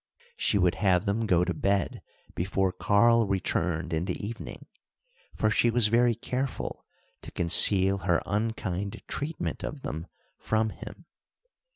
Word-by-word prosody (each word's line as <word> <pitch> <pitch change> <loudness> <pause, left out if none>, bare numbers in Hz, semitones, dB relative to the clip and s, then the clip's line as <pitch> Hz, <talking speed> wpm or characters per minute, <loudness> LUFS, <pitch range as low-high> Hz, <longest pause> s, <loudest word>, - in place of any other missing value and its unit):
She 105 - 0
would 90 -3 +2
have 95 -1 +2
them 100 +2 0
to 115 - -1
go 90 -2 +3
to 90 - -2
bed 100 +3 -1 0.3
before 95 +1 -1
Karl 115 +4 +3
returned 85 -3 -2
in 80 +2 -1
the 90 - -3
evening, 115 +2 -8 0.7
for 110 - +1
she 120 - +3
was 115 -2 +3
very 120 +1 +3
careful 130 +4 -4 0.4
to - - -10
conceal 95 +3 +5
her 90 -3 +1
unkind 100 -3 -3
treatment 150 +3 -4
of 145 -3 -6
them 80 +3 -5 0.3
from 110 0 0
him. - - -11
100 Hz, 145 wpm, -27 LUFS, 90-115 Hz, 0.7 s, conceal